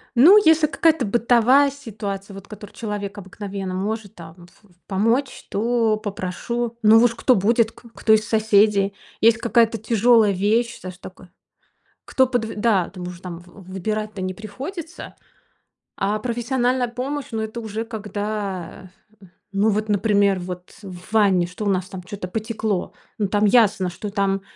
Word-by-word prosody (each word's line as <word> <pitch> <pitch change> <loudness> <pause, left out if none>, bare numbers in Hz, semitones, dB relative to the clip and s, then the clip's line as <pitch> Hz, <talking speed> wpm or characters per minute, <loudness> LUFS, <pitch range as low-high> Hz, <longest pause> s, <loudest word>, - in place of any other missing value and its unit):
Ну, 325 - +8
если 320 -1 +5
какая-то 315 -3 +2
бытовая 240 +5 +4
ситуация, 205 -7 -7
вот 195 0 -10
в - - -28
которой 210 -1 -10
человек 210 -2 -5
обыкновенно 195 -1 -6
может 205 +2 -3
там 165 +1 -12
ф 175 +4 -21
ф 200 - -25 0.2
помочь, 230 +8 0
то 225 0 +1
попрошу, 220 +4 -4
ну 215 +1 +7
уж 235 -1 +3
кто 255 - +3
будет, 225 +3 +2
к 240 - -20
кто 220 - +3
из 215 -1 +2
соседей. 210 -2 +3 0.3
Есть 225 0 +5
какая-то 230 -1 +2
тяжелая 225 0 +4
вещь, 220 +5 0
саж 185 -1 -9
такой. 185 0 -12 0.8
Кто 260 -1 +2
подв 245 -3 -1
Да, 205 -4 +1
там 180 -2 -7
уже, 180 -1 -9
там 175 -3 -7
в 180 +1 -15
выбирать-то 210 +2 -3
не 185 0 -3
приходится. 310 - -8 0.8
А 205 +2 0
профессиональная 245 +2 0
помощь- 265 +4 -4
ну, 220 -1 -2
это 220 +2 -5
уже 220 0 -4
когда, 205 -4 -5 0.6
ну 200 +2 +2
вот, 215 +1 -1
например, 200 -1 +2
вот 180 0 -8
в 185 0 -11
ванне, 195 -5 +4
что 180 +4 -7
у - - +1
нас 185 -2 0
там, 190 -1 -8
чё-то 195 0 -7
потекло. 215 -1 -3 0.3
Ну, 205 - +1
там 205 +2 +1
ясно, 205 -4 +3
что 180 +4 -6
там 195 -1 0
210 Hz, 160 wpm, -22 LUFS, 195-230 Hz, 0.8 s, Ну